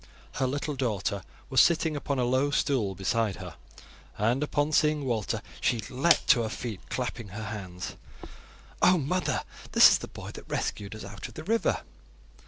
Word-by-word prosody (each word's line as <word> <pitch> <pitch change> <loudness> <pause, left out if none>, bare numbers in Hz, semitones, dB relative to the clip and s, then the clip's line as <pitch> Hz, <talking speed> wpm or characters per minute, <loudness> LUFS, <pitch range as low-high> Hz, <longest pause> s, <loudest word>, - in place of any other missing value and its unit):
Her 130 - 0
little 145 +3 -2
daughter 105 -6 -1 0.3
was 130 -3 +7
sitting 160 -2 +3
upon 140 -1 -2
a 125 - +2
low 130 +3 +2
stool 130 -9 +1
beside 105 +2 0
her, - - -8 0.6
and 115 +6 +1
upon 150 0 0
seeing 150 -1 +3
Walter 115 -5 -1 0.2
she 120 - +2
leapt 140 +7 +3
to 120 - +6
her 110 - -2
feet, 110 -3 -5
clapping 120 -3 -3
her 105 +3 -7
hands. 90 -3 -6 0.8
"Oh! 180 0 +6
mother, 175 +5 0 0.3
this - - +9
is - - +3
the - - -7
boy - - -9
that - - -11
rescued 100 +1 -3
us 110 - -8
out 100 +3 -7
of 120 - -15
the 155 - -6
river." 225 +6 +1
125 Hz, 175 wpm, -28 LUFS, 105-145 Hz, 0.8 s, this